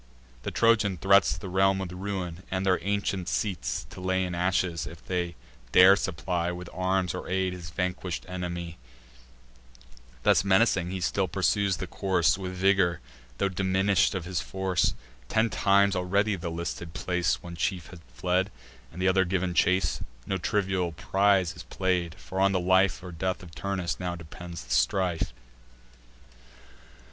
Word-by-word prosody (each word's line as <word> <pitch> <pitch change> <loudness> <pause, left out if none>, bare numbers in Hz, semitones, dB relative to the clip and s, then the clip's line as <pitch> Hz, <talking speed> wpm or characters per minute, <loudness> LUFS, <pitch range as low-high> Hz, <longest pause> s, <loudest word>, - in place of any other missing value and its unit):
The - - -3
Trojan 110 -4 +3
threats 100 +2 +4
The 100 - -7
realm 95 +1 +3
with 95 -2 -4
ruin, 90 -2 -4
and 95 0 -1
their 95 -1 +3
ancient 100 -2 -1
seats 80 - -2
To - - -9
lay 95 0 +1
in 90 - -4
ashes, 90 -1 0
if 85 -1 -11
they 90 -2 -2 0.4
dare 95 +2 +9
supply 90 -2 -2
With 90 0 -7
arms 95 0 0
or 90 - -6
aid 95 0 0
his 85 -2 -8
vanquish'd 90 0 -3
enemy: 85 -2 -5 1.4
Thus 90 - +4
menacing, 95 -2 +3
he 95 0 -4
still 95 +2 +1
pursues 95 +1 +1
the - - -4
course, 95 -3 +1
With 95 -1 -5
vigour, 95 -2 +2 0.4
tho' 100 - +1
diminish'd 95 +2 +2
of 90 -3 -3
his 90 -1 -2
force. 95 -2 0 0.3
Ten 110 0 +2
times 100 +1 +3
already 100 +3 +1
round 95 - -5
the 85 - -3
listed 85 0 -5
place 90 -1 0
One 85 -1 -8
chief 85 0 -2
had 90 - -11
fled, 90 +8 0 0.4
and 90 - -7
t' 95 - +2
other 95 0 +4
giv'n 95 0 -1
the - - -4
chase: 90 +2 +2 0.2
No 95 - -2
trivial 95 -3 0
prize 95 +2 +2
is 85 - -9
play'd; 90 -3 -1
for 95 0 -6
on 100 0 +4
the 95 - +2
life 95 +1 +3
Or 90 - -7
death 95 +3 -3
of 85 -2 -12
Turnus 95 -2 -3
now 90 -2 -3
depends 85 -1 -9
the - - -12
strife. 85 +7 +1
95 Hz, 165 wpm, -27 LUFS, 85-95 Hz, 1.4 s, dare